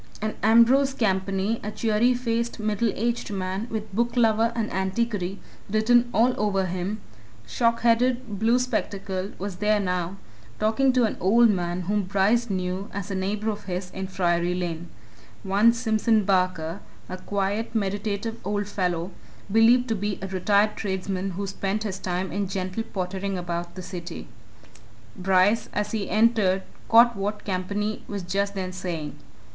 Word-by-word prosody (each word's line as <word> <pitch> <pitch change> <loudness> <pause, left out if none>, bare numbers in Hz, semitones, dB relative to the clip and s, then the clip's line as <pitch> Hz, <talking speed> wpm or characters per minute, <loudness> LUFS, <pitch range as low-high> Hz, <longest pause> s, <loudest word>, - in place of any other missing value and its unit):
And 215 0 -2
Ambrose 240 +5 +5
Campany, 195 0 0
a 210 - -3
cheery 220 +3 +2
faced, 235 -1 -2
middle 215 +1 0
aged 235 +2 -1
man, 190 +2 -3
with 215 -3 -5
booklover 230 -1 +2
and 225 -2 -2
antiquary 190 0 -1 0.3
written 235 +3 +3
all 240 +2 +3
over 195 -2 +1
him, 185 +4 -3 0.5
shockheaded, 235 - +1
blue 230 +3 +3
spectacled, 200 -6 -3
was 195 -1 -5
there 210 +1 +2
now, 180 -1 -2 0.4
talking 240 +5 +3
to 250 -1 +3
an 220 - 0
old 230 +5 +5
man 175 -2 -2
whom 205 +4 0
Bryce 205 +5 +2
knew 185 +1 -2
as 200 0 -5
a - - -2
neighbour 205 +3 -1
of 210 0 -8
his 180 0 -4
in 190 0 -5
Friary 175 -1 0
Lane 175 -1 -4 0.5
one 200 +4 +4
Simpson 220 -2 +1
Barker, 185 -3 +1 0.3
a 185 - -5
quiet, 200 +4 -2
meditative 205 +2 -2
old 205 +1 -2
fellow, 180 -3 -1 0.4
believed 235 +3 +5
to 225 - +1
be 205 -1 -2
a - - -2
retired 200 +3 +2
tradesman 190 -1 -2
who 200 - -2
spent 195 +2 -2
his 195 -3 -4
time 185 0 -2
in 200 +1 -1
gentle 185 +2 -3
pottering 195 -1 -3
about 175 -1 -4
the 185 - -7
city. 180 -2 -7 0.9
Bryce, 190 +4 +2
as 210 0 -1
he 215 -3 -2
entered, 215 -4 +3 0.3
caught 235 +1 +7
what 205 +2 -3
Campany 200 +3 -2
was 200 -2 -4
just 200 +3 -1
then 185 -1 -3
saying. 175 -5 -5
200 Hz, 150 wpm, -25 LUFS, 185-225 Hz, 0.9 s, caught